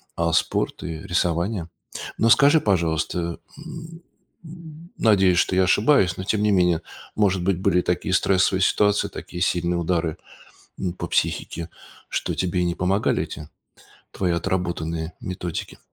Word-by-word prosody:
а 85 -1 0
спорт 80 - 0
и 80 -1 -5
рисование. 85 +1 -1 0.5
Но 115 - +3
скажи 145 +6 +6
пожалуйста, 85 -4 0
э, 85 - -7
м, 165 +1 -9 0.4
м, 165 0 -12
надеюсь 95 -5 +4
что 90 - +2
я 95 - +4
ошибаюсь, 100 -2 +3
но 95 - -4
тем 105 +2 0
не 105 - +3
менее, 90 -4 +3 0.3
может 95 -4 +2
быть 95 -1 +1
были 95 -2 +2
такие 90 +1 -1
стрессовые 95 0 +2
ситуации, 105 +1 +2
такие 90 - -8
сильные 85 0 0
удары, 85 -2 -1 0.6
м, 90 -2 -2
по - - -5
психике, 85 0 -1 0.4
что - - -2
тебе 90 -1 0
не 85 -1 0
помогали 95 +4 +1
эти 75 0 -9 0.6
твои 90 -2 0
отработанные 85 -2 -2
методики. 90 -2 -5
90 Hz, 145 wpm, -23 LUFS, 85-105 Hz, 0.6 s, скажи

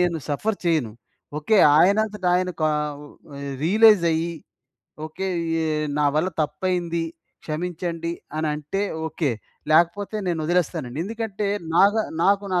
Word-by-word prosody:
నేను 175 -2 +1
suffer 200 +9 -1
చెయను. 155 -10 +1 0.5
Okay. 210 +8 +2 0.2
ఆయనంతటాయన 190 -1 +2
కావ్ 150 -1 0 0.6
రియలైజయ్యి, 170 -4 +4 0.7
okay. 190 +5 -4 0.4
ఎ 160 - -1 0.3
నా 145 - +3
వల్ల 160 +4 +2
తప్పయింది. 170 +2 -1 0.4
క్షమించండి. 170 +1 -3 0.3
అనంటే, 155 +5 -2 0.2
ఓకే. 155 -3 -1 0.4
లేకపోతే 175 +6 +2
నేను 170 -2 -1
వదిలేస్తానండి. 160 -6 -1
ఎందుకంటే, 215 -1 -3 0.3
నాగ 200 +4 +6 0.3
నాకు 200 +1 +3
నా 180 - +3
170 Hz, 105 wpm, -23 LUFS, 155-195 Hz, 0.7 s, నాగ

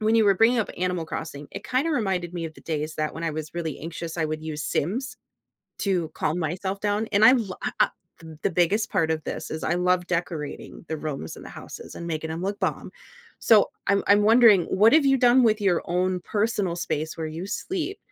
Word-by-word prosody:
when 215 +1 +2
you 220 - +5
were 200 -1 +5
bringing 230 +4 +4
up 220 - -1
Animal 180 -2 -1
Crossing, 150 -3 -6
it 195 - -8
kinda 270 +6 0
reminded 190 - -1
me 170 -1 -3
of 160 -1 -6
the - - -15
days 155 -1 -3
that 155 0 -2
when 165 +1 -5
I 165 - 0
was 155 +1 -6
really 160 -4 -3
anxious 165 +1 -6
I 160 - 0
would 155 0 -4
use 155 -1 -4
Sims 250 - -2 0.6
to 180 -5 0
calm 155 +3 -1
myself 185 +4 -3
down, 210 +1 0
and 205 +2 +5
I 245 - +9
lo 215 -8 0
I - - -1
I - - +6 0.3
th 160 -2 -11
the - - +1
biggest 180 +5 +1
part 160 -1 +1
of 155 -1 -1
this - - -5
is 160 - -5
I 170 - +1
love 180 0 +1
decorating 165 -3 -4
the 160 - -2
rooms 145 - -5
and - - -11
the - - -9
houses - - -10
and 170 - -7
making 160 -1 -3
'em 165 +2 -4
look 200 +1 -2
bomb. - - -2 0.5
So, 220 -3 +5 0.2
I'm 200 0 +3
I'm 205 +1 +5
wondering, 220 -4 +6
what 215 +6 +4
have 310 -2 +5
you 270 0 +5
done 245 +1 +5
with 220 -2 +3
your 190 -4 +2
own 180 +1 0
personal 205 -3 -1
space 155 -2 -3
where 160 - -2
you 165 +4 -6
sleep? 370 - -3
180 Hz, 230 wpm, -25 LUFS, 160-210 Hz, 0.6 s, I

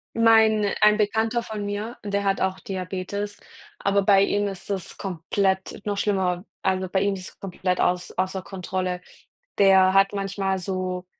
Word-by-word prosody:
Mein 220 -2 +4
ein 210 0 +6
Bekannter 220 +2 +1
von 215 -2 -5
mir, 210 +4 -4
der 200 0 -1
hat 195 0 +1
auch 190 0 0
Diabetes, 195 +2 -4 0.4
aber 200 0 +2
bei 195 0 +5
ihm 205 0 +1
ist 195 +1 -9
es 195 -3 -4
komplett 190 +2 -2
noch 205 -1 -1
schlimmer. 190 -3 0 0.2
Also, 185 -1 0
bei 190 +1 +1
ihm 200 0 +1
ist 185 -1 -9
komplett 185 -1 -2
auß 180 0 0
außer 185 0 -1
Kontrolle. 185 -1 -3 0.6
Der 190 -1 +6
hat 195 0 +5
manchmal 195 -1 -1
so, 185 -1 -3
195 Hz, 155 wpm, -24 LUFS, 185-205 Hz, 0.6 s, ein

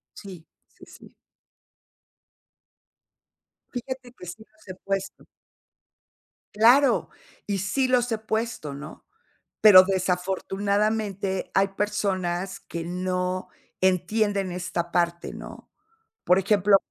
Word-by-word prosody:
Sí, 185 -5 -11 0.2
sí, - - -18
sí. - - -16 2.6
Fíjate 250 0 -6
que - - -10
sí 200 +5 -9
los 215 -1 -25
he 185 - -7
puesto. 195 0 -4 1.3
Claro. 245 +6 +4 0.4
Y 200 - -1
sí 200 +8 0
los 245 -1 +2
he 225 - +1
puesto, 220 -9 -3
¿no?, 150 +3 -10 0.6
pero 195 -4 +10
desafortunadamente 195 +2 -1
hay 195 +1 +3
personas 190 -3 -2
que 170 -1 -6
no 180 +1 -2 0.3
entienden 195 +1 +1
esta 175 -1 -3
parte, 170 0 0
¿no?, - - -11 0.6
por 180 +1 +4
ejemplo, 200 0 +4
195 Hz, 100 wpm, -25 LUFS, 180-215 Hz, 2.6 s, pero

